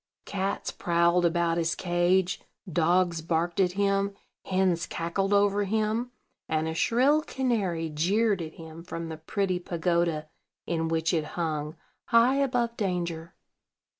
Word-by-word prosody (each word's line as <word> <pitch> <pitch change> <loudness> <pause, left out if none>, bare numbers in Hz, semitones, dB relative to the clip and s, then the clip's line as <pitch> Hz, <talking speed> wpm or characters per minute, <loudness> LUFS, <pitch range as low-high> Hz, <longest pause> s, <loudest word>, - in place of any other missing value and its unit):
Cats 195 0 -2
prowled 170 +1 +2
about 170 0 +1
his 165 0 0
cage; 175 +1 +1 0.3
dogs 175 0 +2
barked 170 +2 -1
at 180 -2 +3
him; 200 0 +1 0.3
hens 185 -3 +1
cackled 180 +5 -2
over 205 0 +3
him; 220 +4 0 0.4
and 155 0 0
a 160 - -2
shrill 260 - +3
canary 210 - -1
jeered 195 +6 +1
at 160 -1 -6
him 160 0 -10
from 165 -1 -6
the 160 - -6
pretty 185 +3 -1
pagoda 170 -2 0 0.4
in 165 -1 -1
which 160 0 0
it 160 -2 +1
hung, 155 -2 -2 0.3
high 235 +4 +4
above 245 -4 0
danger. 175 -4 -3
175 Hz, 135 wpm, -27 LUFS, 165-200 Hz, 0.4 s, high